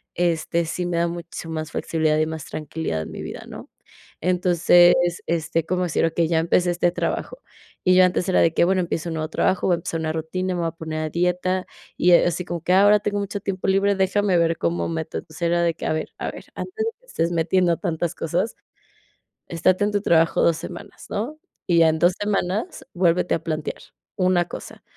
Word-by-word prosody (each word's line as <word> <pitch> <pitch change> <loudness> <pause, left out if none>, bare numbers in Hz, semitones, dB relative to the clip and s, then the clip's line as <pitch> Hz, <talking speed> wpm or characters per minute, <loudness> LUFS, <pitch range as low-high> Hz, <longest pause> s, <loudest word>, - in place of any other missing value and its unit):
este, 170 -1 0
sí 175 +2 -3
me 175 -1 -1
da 170 0 +2
muchísima 170 -1 -6
más 155 0 -4
flexibilidad 155 -2 0
y 155 - +2
más 160 -2 -6
tranquilidad 155 - -4
en - - -7
mi - - -7
vida, - - -7
¿no? - - -10 0.5
Entonces, 175 0 +5 0.3
este, 165 0 -1
como 180 +2 -1
decir, 170 -2 +1
okey, 165 0 +1
ya 165 -1 +2
empecé 175 +2 +2
este 175 0 +1
trabajo. - - -3 0.4
Y 185 - +4
yo 185 0 +7
antes 180 +1 0
era 185 - +3
de 165 - +3
que, - - +3
bueno, 185 +2 +2
empiezo 170 -1 -3
un 165 - -4
nuevo 155 0 -2
trabajo, 185 +3 +1
voy 180 - +4
a - - +2
empezar 165 0 -4
una 160 -1 -2
rutina, 180 +4 -2
me 175 - -2
voy 165 - 0
a - - -9
poner 160 -1 -5
a 155 - -2
dieta, 180 +2 0 0.3
y, 180 0 +4
ah, 170 - +6
así 175 +1 -2
como 170 -1 -4
que 180 - -1
ahora 205 +2 +6
tengo 205 0 -1
mucho 200 0 -4
tiempo 195 -1 -3
libre, 195 +1 +3
déjame 195 0 +2
ver 165 -1 +2
cómo 85 0 -1
meto. 80 -1 -4
Entonces 80 - -10
era 170 0 +2
de 170 -1 +2
que, - - -8
a - - 0
ver 155 - -4
a - - -3
ver, - - -11
antes 440 +4 -4
de 455 - -1
que - - -25
estés 170 - -1
metiendo 170 +1 +2
tantas 165 0 -2
cosas, 175 +7 -2 0.9
estate 185 +4 +2
en 210 - 0
tu 205 -1 0
trabajo 165 -4 +3
2, 165 -2 +3
semanas, 175 +1 -9
¿no? 260 +9 -4 0.3
Y 175 -3 +3
ya 165 -1 +6
en 160 0 +1
2, 175 +3 +4
semanas 205 - -2
vuélvete 180 0 +2
a 165 - -2
plantear, 155 -2 -4 0.4
una 180 -3 +2
cosa - - -9
175 Hz, 220 wpm, -23 LUFS, 165-185 Hz, 0.9 s, yo